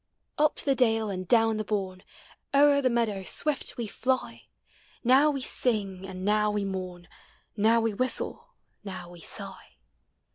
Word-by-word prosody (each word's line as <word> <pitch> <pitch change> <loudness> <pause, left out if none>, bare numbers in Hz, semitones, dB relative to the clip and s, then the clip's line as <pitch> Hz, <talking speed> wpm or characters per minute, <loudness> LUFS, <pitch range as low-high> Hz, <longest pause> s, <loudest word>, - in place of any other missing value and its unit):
Up 300 0 +3
the 275 - 0
dale 225 -5 +1
and 185 -1 -5
down 225 -1 +3
the 215 - -2
bourne, 190 -3 -3 0.5
O'er 285 0 +5
the 255 - +2
meadow 230 -5 0
swift 295 +8 -1
we 235 - -3
fly; 255 +4 -2 0.6
Now 265 +5 +5
we 275 -2 -2
sing, 200 -7 -2
and 185 0 -7
now 210 0 +2
we 210 -1 -1
mourn. 185 -2 -6 0.5
Now 225 +2 +3
we 225 -1 0
whistle, 255 +5 -2 0.3
now 185 -3 -8
we 175 - -13
sigh. - - -2
215 Hz, 150 wpm, -27 LUFS, 190-255 Hz, 0.6 s, O'er